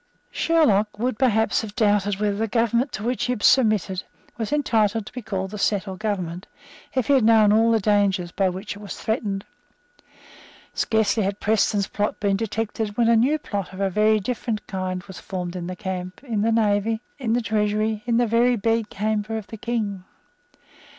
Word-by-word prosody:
Sherlock 215 -11 +2
would, 245 +1 -2
perhaps, 225 -4 +2
have 210 -2 -8
doubted 205 -3 +2
whether 205 -1 0
the 225 +1 0
government 235 +4 +1
to 215 - -5
which 245 +2 -1
he 250 - 0
had 210 - -6
submitted 215 -7 +3 0.3
was 225 -3 -4
entitled 225 -7 +1
to - - -11
be 250 - -5
called 190 -2 -4
a 210 - -5
settled 195 -2 -1
government, 185 -4 -3 0.5
if 260 -3 +1
he 285 - +3
had 265 -4 +4
known 215 -2 +5
all 225 +1 +4
the 225 -1 +3
dangers 200 -4 +1
by 190 0 +1
which 190 +3 -6
it - - -11
was 205 -1 -7
threatened. 205 -3 -2 1.3
Scarcely 220 -1 +1
had 200 0 -2
Preston's 210 -1 +2
plot 205 0 -2
been 200 -2 +1
detected; 215 0 -3
when 235 -1 +3
a 235 - +5
new 260 +7 +3
plot 200 -10 -5
of 190 - -9
a 195 -1 0
very 215 +2 +3
different 220 0 -3
kind 185 -1 -4
was 190 -2 -10
formed 180 -2 -5
in 175 -1 -4
the 185 - -5
camp, 185 +1 -5
in 225 -6 -2
the 225 +2 +2
navy, 220 0 +1 0.2
in 230 -4 0
the 240 - +2
treasury, 215 0 0
in 235 -1 +2
the 240 - +3
very 235 +2 +3
bedchamber 220 -1 -1
of 215 - -6
the 225 - -9
King. 210 -4 -3
215 Hz, 190 wpm, -23 LUFS, 200-225 Hz, 1.3 s, known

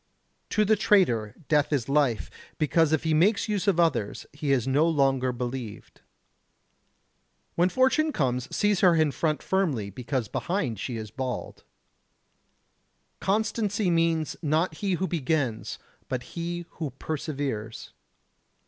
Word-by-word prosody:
To 215 -1 +2
the 215 +2 +4
traitor, 125 - +2
death 150 -1 +2
is 135 -6 0
life, 140 -6 +1 0.3
because 155 +1 +2
if 160 -1 +1
he 160 -1 +1
makes 200 +9 +3
use 205 -2 -1
of 185 -4 +3
others 135 -12 +1
he 145 -1 -2
is 135 -2 +2
no 145 +5 +3
longer 135 -4 +2
believed. 125 -3 -6 1.5
When 175 +2 +3
fortune 265 +7 +2
comes 125 - -1
seize 205 -2 +1
her 180 -3 +5
in 155 -2 +3
front 155 +2 -1
firmly, 145 - 0
because 125 +2 -3
behind 130 - -2
she 120 +1 -4
is 110 -2 -7
bald. 130 0 -5 1.6
Constancy 210 -1 0
means, 165 -2 +1
not 155 +1 0
he 200 -2 -1
who 185 +2 0
begins, 145 -8 -1 0.3
but 125 -1 -2
he 175 0 -4
who 155 -3 -2
perseveres. 140 -8 -4
155 Hz, 130 wpm, -27 LUFS, 130-180 Hz, 1.6 s, her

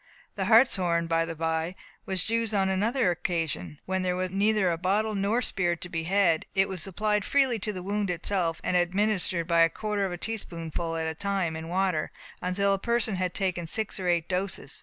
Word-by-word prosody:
The 195 - -2
hartshorn, 185 -7 +4
by 165 0 +1
the 165 0 -5
by, 160 +2 -1 0.3
was 190 -3 +2
used 225 -1 0
on 190 -1 +2
another 210 +2 +2
occasion, 160 - -3
when 190 0 -1
there 180 -1 0
was 185 0 -2
neither 200 -1 +2
a 165 - -1
bottle 205 +4 +1
nor 205 +5 +1
spirit 175 -3 0
to 180 - -5
be 165 -2 -3
had. 180 -3 +2
It 195 0 +4
was 185 -3 -6
applied 210 +2 0
freely 265 -3 +2
to 210 +2 -2
the 185 -3 -6
wound 205 +1 -1
itself, 175 -1 -1
and 180 - 0
also 180 - +5
administered 185 -2 0
by 170 -1 +3
a 165 - +6
quarter 210 0 -2
of 190 - -1
a 175 - -4
teaspoonful 170 -5 -4
at 160 0 -2
a 160 - -2
time 190 -2 -1
in 160 0 -6
water, 180 -3 0 0.3
until 195 +2 +1
the 195 - +1
person 235 0 0
had 180 -1 -2
taken 180 -4 -1
six 215 +4 -1
or 185 - -3
eight 170 -2 +1
doses. 185 -6 -3
185 Hz, 210 wpm, -27 LUFS, 170-205 Hz, 0.3 s, a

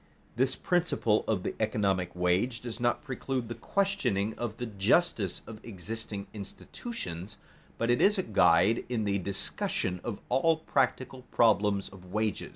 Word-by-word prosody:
This 130 +2 +2
principle 175 - +1
of 100 -5 0
the - - -2
economic 100 -5 0
wage 90 +8 +1
does 120 -2 -6
not 120 0 +1
preclude 130 -2 -3
the - - -2
questioning 115 - 0
of 115 -2 -4
the 120 - -3
justice 105 - +1
of 110 -1 -10
existing 105 0 -5
institutions, 100 - -7 0.4
but 115 +1 +1
it 120 - +2
is 205 +1 +5
a 190 - +1
guide 105 - +4
in 120 -3 0
the 100 -1 +1
discussion 90 -1 -1
of 115 -4 -4
all 155 +6 +3
practical 130 -3 0
problems 105 -3 +3
of 90 -2 -14
wages. 105 0 -1
110 Hz, 150 wpm, -30 LUFS, 100-125 Hz, 0.4 s, is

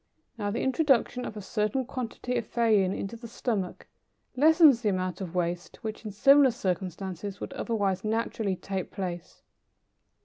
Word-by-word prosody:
Now, 205 -3 -2
the 220 - -2
introduction 265 -3 +2
of 215 - -6
a 205 - -6
certain 215 +5 -1
quantity 250 0 -4
of 235 - -4
theine 215 -5 +3
into 195 +4 -5
the 235 +1 -9
stomach 220 -5 -3 0.5
lessens 300 -2 +6
the 215 - +1
amount 185 -1 -2
of 180 -2 -6
waste 175 0 -2
which 215 0 -5
in 210 - -4
similar 275 +7 +6
circumstances 190 -2 -4
would - - -6
otherwise 200 -5 -1
naturally 220 -2 -1
take 190 0 -4
place. 180 -2 -6
210 Hz, 150 wpm, -28 LUFS, 190-240 Hz, 0.5 s, lessens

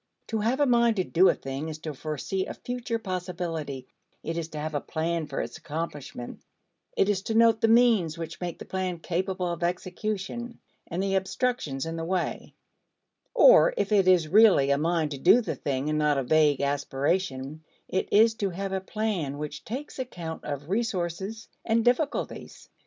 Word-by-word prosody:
To 225 - -1
have 235 +6 0
a 290 - +4
mind 235 -3 +4
to 185 - +1
do 180 +2 +4
a - - +2
thing 135 +4 -5
is 155 - -6
to 155 -2 -5
foresee 155 +6 -3
a - - -6
future 245 -1 -3
possibility; 175 - -4 0.4
it 165 - -3
is 165 -1 -3
to 155 - -8
have 155 +1 -4
a 145 - -1
plan 165 0 -2
for 140 - -3
its 115 +1 -6
accomplishment; 145 -5 -6 0.6
it - - +4
is 205 -2 +1
to 220 +2 -3
note 225 -1 +5
the - - +4
means 225 -8 +4
which 165 +1 -7
make 175 -2 -4
the - - -9
plan 185 -2 -2
capable 185 +2 -2
of 170 - -5
execution 195 +6 -3 0.3
and 175 +3 -2
the 195 0 0
obstructions 190 - -1
in 165 0 -4
the 165 - -3
way, 180 +1 -3 0.8
or, - - +7
if - - -1
it 195 -3 +4
is 180 -4 +5
really 185 -7 +6
a 140 - +3
mind 160 -1 0
to 140 - -5
do 190 - +6
the 235 - -2
thing 135 0 -2
and 155 0 0
not 150 -1 +2
a 135 - 0
vague 150 +1 +3
aspiration 140 +1 -1 0.2
it 190 - -2
is 225 +2 +6
to 205 -3 -2
have 195 +2 -4
a 190 - -1
plan 190 -9 -2
which 150 0 -6
takes 265 +5 -6
account 175 -11 -6
of 145 0 -5
resources 195 0 -2 0.2
and 230 0 +1
difficulties. 255 +5 -1
180 Hz, 185 wpm, -27 LUFS, 155-215 Hz, 0.8 s, or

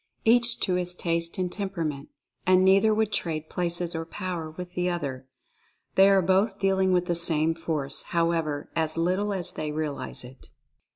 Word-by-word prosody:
Each 235 +1 +4
to 185 - +1
his 180 0 -1
taste 170 -1 -1
and 180 -1 -1
temperament 165 -9 -4 0.2
— - - -39
and 185 0 +5
neither 195 +3 +5
would 215 0 +1
"trade" 155 -2 -3
places 175 -1 -1
or 165 0 -3
power 170 -2 -5
with 180 +3 -9
the 180 0 0
other. 135 -7 -4 0.7
They 195 +1 +6
are 195 -1 +4
both 195 +3 +2
deal 195 -1 +1
ing 190 0 +3
with 180 -1 +2
the 175 - 0
same 165 -1 +3
Force, 155 -4 -2
however, 165 -4 -1
as 160 0 0
little 185 +5 0
as 185 -4 -2
they 155 -1 -4
realize 150 -4 -4
it. 130 +2 -14
175 Hz, 180 wpm, -26 LUFS, 160-190 Hz, 0.7 s, They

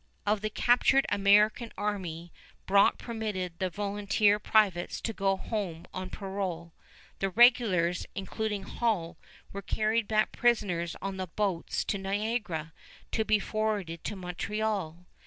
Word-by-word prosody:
Of 210 0 +1
the 215 - -1
captured 245 +5 +3
American 210 +3 +3
army 180 -5 -4 0.3
Brock 200 +1 +4
permitted 210 -7 -4
the 185 - 0
volunteer 205 +1 +1
privates 205 -5 +2
to 225 - -3
go 195 -1 +1
home 190 -6 -4
on 185 0 -5
parole. 190 -4 -4 0.5
The 195 - 0
regulars, 190 -6 +4
including 205 +1 -3
Hull, 185 -7 -1 0.4
were 200 - -5
carried 215 +2 0
back 215 -1 +2
prisoners 190 -8 +1
on 195 -1 -3
the 185 -1 -3
boats 185 -1 -1
to 200 - -1
Niagara, 195 -5 -2 0.4
to 220 - +1
be 215 0 +3
forwarded 210 -6 -2
to 210 - -3
Montreal. 185 -1 -3
200 Hz, 130 wpm, -29 LUFS, 180-215 Hz, 0.5 s, Brock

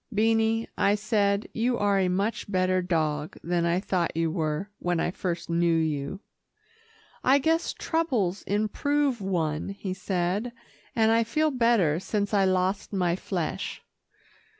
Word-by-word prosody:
"Beanie," 225 +1 +2
I 200 - +4
said, 205 -1 +1
"you 240 +2 +1
are 200 -1 +2
a 185 - +2
much 200 +3 -1
better 185 -1 +2
dog 155 -4 -1
than 170 0 0
I 170 +2 +2
thought 180 -4 -1
you 165 -1 +1
were, 160 +4 -2
when 175 -1 0
I 175 - 0
first 175 -2 -3
knew 170 0 +2
you." 155 +3 -2 1.0
"I 265 +2 +5
guess 320 +4 +1
troubles 245 - -1
improve 250 +5 0
one," 165 -5 -1
he 195 -1 -4
said, 190 +4 -2 0.4
"and 220 -1 +4
I 230 0 +4
feel 305 +7 +1
better 230 - +3
since 205 +2 -2
I 200 -2 +4
lost 185 +1 0
my 180 -4 +1
flesh." 180 -3 -4
195 Hz, 145 wpm, -27 LUFS, 175-225 Hz, 1.0 s, I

